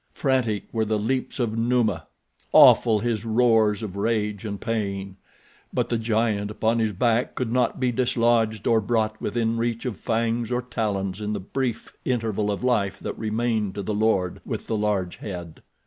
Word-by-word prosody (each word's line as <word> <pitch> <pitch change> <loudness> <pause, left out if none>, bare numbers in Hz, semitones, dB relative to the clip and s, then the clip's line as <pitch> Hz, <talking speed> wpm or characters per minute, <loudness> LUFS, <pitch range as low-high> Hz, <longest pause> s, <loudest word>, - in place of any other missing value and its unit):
Frantic 125 -7 0
were 110 -1 +1
the 110 0 0
leaps 130 +6 -2
of 115 -3 0
Numa—awful 115 0 +3
his 115 -3 -1
roars 110 -2 +3
of 100 -3 -5
rage 105 -1 -1
and 100 -2 -4
pain; 100 -4 -3 0.5
but - - -1
the 120 - +1
giant 110 -2 0
upon 110 +2 0
his 110 -1 +1
back 115 +4 +1
could 125 -3 -2
not 125 +1 +1
be 125 -1 +1
dislodged 115 -3 +1
or 115 -1 +3
brought 110 0 -1
within 115 +1 -1
reach 115 +1 -2
of 120 -7 -3
fangs 115 0 -1
or 125 0 0
talons 100 -5 -2
in 105 0 -2
the 105 - -2
brief 125 +5 -3
interval 110 -4 -1
of 100 +3 -2
life 110 -6 +1
that - - -4
remained 110 -2 -1
to 100 - -4
the 105 - -2
lord 100 -4 +1
with - - -5
the 115 - -2
large 105 -4 -1
head. 90 -5 -7
110 Hz, 170 wpm, -24 LUFS, 105-120 Hz, 0.5 s, Numa—awful